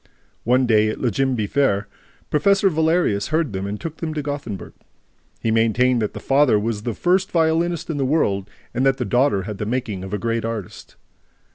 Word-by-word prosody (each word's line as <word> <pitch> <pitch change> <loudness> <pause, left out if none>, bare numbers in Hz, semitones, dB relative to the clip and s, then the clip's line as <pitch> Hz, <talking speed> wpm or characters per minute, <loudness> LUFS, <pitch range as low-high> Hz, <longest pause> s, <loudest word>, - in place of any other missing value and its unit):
One 125 +2 +3
day, 110 -2 +3
at - - -3
Ljimby 125 -2 0
Fair, 135 -6 +1 0.4
Professor 195 +4 +3
Valerius 160 - +1
heard 155 -7 0
them 95 +1 -3
and 105 +1 -4
took 165 -1 -6
them 160 -2 -4
to 150 - -2
Gothenburg. 140 -9 -5 0.7
He 115 - 0
maintained 115 +2 +2
that 105 - -2
the - - -5
father 135 -4 +3
was 105 0 -2
the 115 +1 -3
first 185 +2 +1
violinist 165 +1 +1
in 160 - -3
the 140 - 0
world 105 -9 0 0.2
and 125 +2 0
that 135 0 +3
the - - -2
daughter 125 -6 +2
had 105 0 -6
the 105 - -3
making 115 -6 -3
of 95 - -7
a 105 - -1
great 115 +1 -1
artist. 115 -4 -6
125 Hz, 190 wpm, -21 LUFS, 105-150 Hz, 0.7 s, One